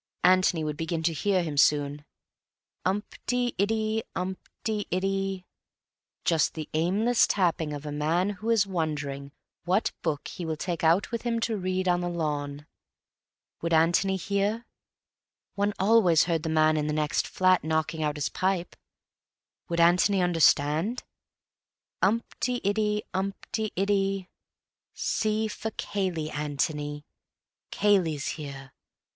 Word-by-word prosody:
Antony 185 -3 +4
would 150 -1 -3
begin 165 0 -2
to 165 0 +2
hear 185 +4 +1
him 150 -3 -4
soon. 145 0 +2 0.8
Umpt 205 +3 -3
y 245 -1 0
iddy 220 +2 +1
umpt 185 +1 -2 0.3
y 215 -2 -1
iddy; 195 0 -1 0.8
just 160 -3 +2
the 155 -2 -5
aimless 200 +9 +3
tapping 170 -5 +1
of 145 0 -6
a 150 - -4
man 165 +7 +1
who 205 +3 -5
is 225 -3 +4
wondering 145 -6 -3 0.3
what 185 +5 +1
book 155 -4 -2
he 180 - -7
will 160 -1 -2
take 170 +1 -3
out 170 +7 +3
with 235 -1 -2
him 235 -1 -1
to 225 -1 0
read 185 -1 -1
on 175 0 +2
the 175 - -2
lawn. 150 -3 -3 1.0
Would 170 0 -1
Antony 170 +4 +3
hear? 200 +4 -1 0.9
One 205 +1 +1
always 190 -5 +5
heard 165 -2 0
the 160 - -3
man 155 0 +3
in 150 0 0
the 150 - -1
next 150 -1 0
flat 185 -1 +3
knocking 160 0 -1
out 150 -1 -1
his 145 - -1
pipe. 185 -2 -1 0.9
Would 170 0 -1
Antony 180 +4 +4
understand? 165 - +2 1.0
Umpt 225 +5 0
y 250 -1 -1
iddy 210 +1 +1
umpt 195 +3 -3
y 215 -1 -1
iddy. 195 -1 0 0.7
C. 215 0 0
for 220 +1 -4
Cayley, 180 -8 -3
Antony. 145 0 -2 0.6
Cayley's 180 -8 +2
here. 140 -3 -7
180 Hz, 140 wpm, -27 LUFS, 155-200 Hz, 1.0 s, always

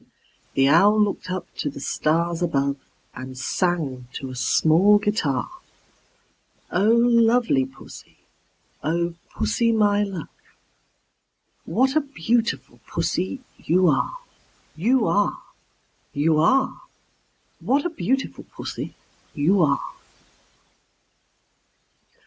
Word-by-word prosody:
The 135 0 +4
Owl 200 +9 +5
looked 205 -3 0
up 185 -1 -3
to 145 - -2
the 140 - -9
stars 165 +4 0
above, 140 -5 0 0.4
And 130 0 -8
sang 135 -4 -1
to 130 -1 -6
a - - -8
small 160 - +4
guitar, 205 - -1 1.2
"Oh, 200 +4 +2
lovely 235 - +3
Pussy, 135 0 -14 0.7
oh, 170 +2 0 0.2
Pussy, 230 -1 +1
my 205 -2 +3
love, 195 -5 -4 1.4
What 265 +2 +1
a 310 - +4
beautiful 165 - -2
Pussy 180 +8 -2 0.2
you 180 +2 +3
are, 330 - 0 0.6
You 230 +8 +2
are, 205 0 +1 0.8
You 155 +2 +2
are! 265 +11 +2 0.8
What 280 +4 +1
a - - +1
beautiful 270 -4 -2
Pussy - - -7 0.4
you 180 +7 +3
are!" 140 -3 0
175 Hz, 100 wpm, -23 LUFS, 145-225 Hz, 1.4 s, Owl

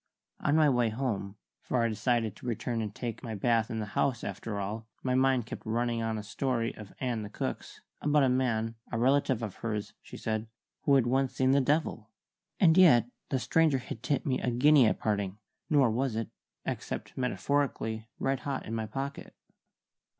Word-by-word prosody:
On 145 - +2
my 155 -1 +5
way 120 -4 +3
home 110 -4 -3 0.3
for 125 -2 0
I - - +3
decided 115 -1 0
to 125 - -10
return 115 0 -1
and 105 -2 -4
take 120 -3 -4
my 115 -4 -5
bath 115 +1 +2
in 115 - -3
the 110 - -2
house, 125 -4 +1
after 100 +1 -4
all 110 +3 -4 0.2
my 130 - +1
mind 130 -2 +3
kept - - -7
running 115 +1 0
on 110 -1 -1
a 105 - -5
story 115 +1 -1
of 105 -2 -10
Ann 120 -4 -1
the 105 - -6
cook's, - - -5 0.2
about 150 -1 +3
a - - +4
man 120 -3 +1 0.2
(a 115 - -1
relative 130 -1 +2
of 105 -4 -5
hers, 105 -2 -3
she - - -10
said) 110 0 -2 0.4
who 140 -3 +5
had 130 -3 +4
once 130 +2 +1
seen 130 0 +3
the 140 +1 +5
devil. 135 -6 0 0.5
And 175 -2 +6
yet 120 - +6 0.2
the 135 - +1
stranger 140 +5 +3
had 125 -3 -7
tipped 140 +1 0
me 130 -2 0
a - - 0
guinea 130 +1 +6
at - - +1
parting, 100 -2 -1 0.3
nor 140 -6 +4
was 125 +1 0
it 115 -1 -2 0.4
(except - - -4
metaphorically) 125 -4 -1
red 135 -1 0
hot 140 -2 -3
in 110 - -5
my 110 -1 -2
pocket. 135 +6 -5
120 Hz, 195 wpm, -30 LUFS, 110-135 Hz, 0.5 s, And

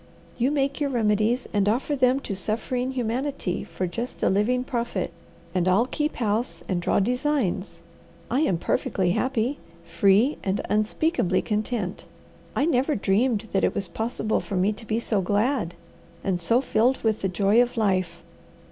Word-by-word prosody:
You 250 +2 +1
make 280 0 0
your 285 - +1
remedies 225 0 +1
and 205 -1 +2
offer 260 +6 0
them 260 0 +3
to 200 - -4
suffering 245 +6 -2
humanity 250 -4 -2
for 170 +2 -4
just 230 +8 -5
a - - +4
living 235 +6 +2
profit, 235 -7 -2 0.4
and 180 -1 +1
I'll 195 +6 +4
keep 300 +4 -2
house 225 +1 -1
and 180 -2 -1
draw - - +2
designs. 250 -3 -1 0.5
I 260 - +2
am 195 - +2
perfectly 180 +1 0
happy, 255 +5 0 0.3
free, 200 - +3
and 195 +1 0
unspeakably 215 - +1
content. 210 -3 -2 0.5
I 285 - +2
never 280 -1 +2
dreamed 215 +2 +1
that 195 - +1
it - - +2
was 195 - -1
possible 220 +3 -1
for 200 - -5
me 190 +3 +2
to 225 +1 -11
be 220 +2 0
so 215 -4 0
glad, 205 0 0 0.5
and 190 -3 0
so 230 +9 +3
filled 255 0 +1
with 220 -1 +1
the 190 - 0
joy 200 +5 +3
of 245 -1 -1
life. 185 -5 0
220 Hz, 165 wpm, -25 LUFS, 195-255 Hz, 0.5 s, a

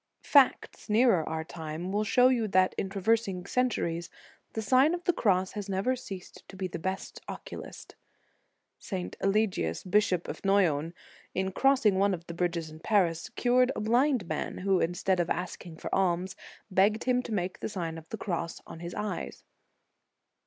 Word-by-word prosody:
| - - -55
Facts 275 -4 +3
nearer 215 -5 +4
our 160 0 -2
time 160 +2 -6
will 205 +2 +1
show 250 +4 +5
you 235 -4 +1
that 185 -1 +3
in 190 - -2
traversing 195 -2 0
centuries, 170 -9 -1 0.4
the 220 - -2
Sign 265 +9 +4
of 350 - -8
the 355 - +2
Cross 190 - +2
has 205 -1 -6
never 195 +7 +1
ceased 195 -7 -9
to - - -10
be 190 -1 -3
the 175 - -6
best 190 +3 -4
oculist. - - -8 0.9
St. 185 -3 -5
Eligius, 195 - +1
Bishop 185 -2 +2
of - - -7
Noyon, 175 -5 +2 0.4
in 190 0 0
crossing 230 -5 +3
one 200 -1 +3
of 170 -1 -12
the 170 - -7
bridges 170 -2 -2
in 155 - -11
Paris, 175 -2 +1
cured 250 +1 +3
a - - -3
blind 240 +1 +2
man, - - -3
who, 190 0 +2
instead 175 +2 0
of 175 - 0
asking 175 -2 -4
for - - -6
alms, 185 0 +1 0.4
begged 205 +4 +3
him 250 -1 +2
to 245 - -8
make 185 -3 -2
the - - -3
Sign 170 -5 -4
of 160 - -18
the 220 - -5
Cross 170 -5 -3
on 165 - -10
his 170 +1 -6
eyes. 210 0 -4
190 Hz, 175 wpm, -29 LUFS, 175-220 Hz, 0.9 s, show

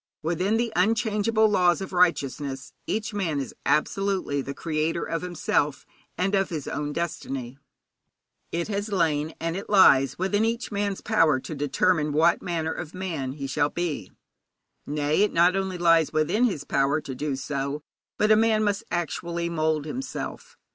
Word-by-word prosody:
Within 180 +7 +1
the 230 -1 -1
unchangeable 220 +2 +2
laws 180 -4 +3
of 190 -1 -6
righteousness 140 -6 0
each 215 0 -2
man 170 -8 -1
is 135 -4 -5
absolutely 190 -3 +1
the 140 +1 -6
creator 160 +1 -1
of 165 - -2
himself 160 -5 -1 0.3
and 190 +2 0
of 195 -1 +2
his 155 -5 -5
own 145 0 -3
destiny. 135 -5 -4 0.9
It 170 0 -2
has 205 0 -2
lain, 160 -4 0
and 165 0 -2
it 195 - -6
lies, 135 -10 +5
within 200 +4 +1
each 230 +1 -1
man's 200 -1 -2
power 150 -5 +3
to 155 - -7
determine 150 +2 +1
what 165 +3 +3
manner 160 -2 -2
of 155 - -7
man 160 -8 -3
he 140 -1 -6
shall 145 +2 +1
be. 170 -3 -3 0.8
Nay, 150 +4 +1
it 210 - +2
not 175 +2 +4
only 190 -1 -2
lies 165 -2 +4
within 155 +10 +2
his 185 - -1
power 140 +1 +1
to 140 - -7
do 145 +2 -2
so, 140 +2 -3 0.3
but 210 +1 +3
a - - +8
man 220 0 +3
must 205 +1 0
actually 170 0 -2
mould 155 -2 0
himself. 270 - -6
170 Hz, 160 wpm, -25 LUFS, 150-195 Hz, 0.9 s, a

